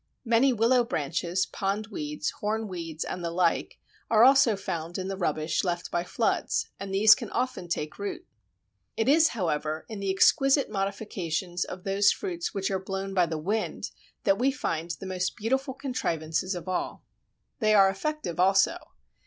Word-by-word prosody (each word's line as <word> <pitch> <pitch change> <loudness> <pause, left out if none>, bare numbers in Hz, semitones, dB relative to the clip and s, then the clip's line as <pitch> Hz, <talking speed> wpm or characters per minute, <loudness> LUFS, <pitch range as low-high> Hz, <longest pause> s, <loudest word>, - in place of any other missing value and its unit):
Many 235 +3 +4
willow 240 +2 +3
branches, 170 - -1
pondweeds, 195 -7 -3
hornweeds, 185 -7 -3
and 180 - -5
the 170 - -1
like, 170 0 0 0.3
are 220 0 +5
also 265 -3 +6
found 170 -3 -4
in 190 0 -4
the 195 - -2
rubbish 155 -3 -1
left 175 -2 -2
by 175 - 0
floods, - - -1
and 195 -1 -6
these 210 +2 +7
can 230 -3 -4
often 250 -8 -2
take 155 -3 -4
root. 365 -3 -5 0.7
It 225 - 0
is, 315 +3 +6
however, 155 - -2
in 215 -2 -7
the 195 -1 -2
exquisite 275 +7 +4
modifications 190 -3 -2
of 185 0 -8
those 195 +1 +3
fruits 350 -3 -3
which 195 0 -2
are 190 - 0
blown 195 +1 -4
by 180 -3 +3
the 160 -1 -3
wind 205 +8 -2 0.3
that 195 0 +2
we 260 +3 +3
find 170 - -3
the 175 +3 -5
most 185 0 -2
beautiful 265 +4 -1
contrivances 185 - -2
of 175 +1 -7
all. 185 -1 -3 0.6
They 215 -2 +3
are 195 -1 +7
effective 195 - -3
also. 195 - +4
195 Hz, 160 wpm, -27 LUFS, 175-225 Hz, 0.7 s, these